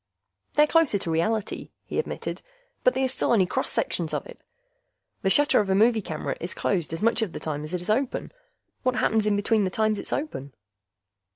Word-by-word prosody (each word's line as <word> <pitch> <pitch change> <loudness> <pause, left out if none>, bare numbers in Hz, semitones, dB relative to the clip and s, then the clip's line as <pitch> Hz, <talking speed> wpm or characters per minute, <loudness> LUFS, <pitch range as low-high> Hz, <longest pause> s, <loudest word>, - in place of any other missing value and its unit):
"They're 300 - +6
closer 315 -8 +3
to 170 -4 -3
reality," 210 +6 -1 0.2
he - - -2
admitted. 460 - -4 0.4
"But - - +4
they 265 - +1
are - - +3
still 260 - 0
only 195 -5 +5
cross - - -2
sections 165 -3 -1
of - - -3
it. - - -12 0.8
The 195 - +2
shutter 290 +8 +5
of 205 -2 0
a 190 - +3
movie 220 +2 +4
camera 155 -5 -4
is 170 - -5
closed 175 -6 -1
as 165 +5 -4
much 230 +1 +3
of 210 -6 -1
the - - -5
time 150 -1 -4
as 155 +4 -4
it 175 - -3
is 185 - -8
open. 255 +4 -1 0.5
What 255 -1 +1
happens 220 -3 +2
in 210 - +3
between 210 +1 +2
the 190 - +1
times 215 +2 +1
it's - - -6
open? 140 - -4
210 Hz, 210 wpm, -26 LUFS, 180-245 Hz, 0.8 s, They're